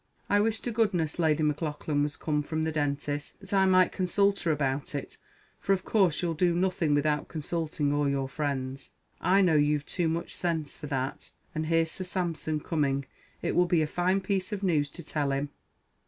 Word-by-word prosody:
I 205 - +5
wish 220 +1 +2
to 240 - -3
goodness 190 -9 0
Lady 155 -2 +3
Maclaughlan 150 -1 -1
was 145 0 -1
come 150 -2 0
from 155 +2 -2
the 160 - 0
dentist's, 145 -1 -2
that 195 0 -8
I 190 -1 +4
might 185 -1 +5
consult 200 +2 +2
her 165 - +1
about 140 -1 -1
it; 140 - -5 0.4
for 195 - +2
of 185 - -2
course, 185 -7 +2
you'll 170 -1 +1
do 170 +2 +2
nothing 175 -4 +1
without 150 0 +1
consulting 155 -2 -2
all 145 -1 +2
your 135 -1 0
friends 135 -2 -3 0.3
I 195 +2 +4
know 180 -4 +4
you've 150 -1 +2
too 175 -3 -1
much 165 +1 -2
sense 160 -4 -2
for 150 - -8
that. 135 0 -3 0.2
An 155 0 -2
here's 165 0 +2
Sir 185 - -4
Sampson 170 -4 -2
coming; 140 -4 0 0.4
it - - 0
will 180 0 +4
be 170 -2 +3
a - - +1
fine 180 +5 +1
piece 190 -1 -1
of 205 -1 -3
news 155 -6 +2
to 170 - -10
tell 150 -2 -1
him." 140 +1 -1
160 Hz, 200 wpm, -28 LUFS, 145-180 Hz, 0.4 s, I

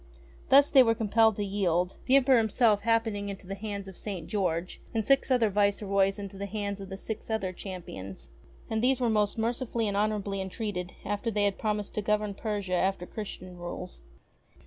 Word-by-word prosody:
Thus 280 +2 +7
they 270 - +8
were 225 -2 +4
com 220 -2 -3
pelled 220 0 +5
to 205 - -2
yield, 180 -3 0
the 265 - +5
Emperor 265 -2 +6
himself 220 -1 +3
happening 225 -3 0
into 195 -1 -7
the 195 - -5
hands 200 -1 -5
of 190 - -9
St. 190 -5 -5
George, 180 -3 -2
and 220 -2 0
six 275 +3 +3
other 240 -5 +3
viceroys 200 -1 +2
into 200 -1 -7
the 200 - -3
hands 200 -1 -3
of 195 - -8
the 190 - -6
six 220 +2 -6
other 195 -4 -1
Champions. 175 - -8 0.4
And 220 0 -1
these 260 0 +3
were 240 -3 +2
most 210 -1 +1
mercifully 230 0 -1
and 200 - -1
honourably 205 -1 0
en 190 - -4
treated 180 -4 -4
after 205 +3 -1
they 210 -2 0
had 200 -1 0
promised 210 -2 -2
to 210 - -1
govern 210 0 0
Persia 200 -2 -3
after 185 0 +1
Christian 185 -3 -7
rules. 175 +1 -6
205 Hz, 195 wpm, -29 LUFS, 195-220 Hz, 0.4 s, they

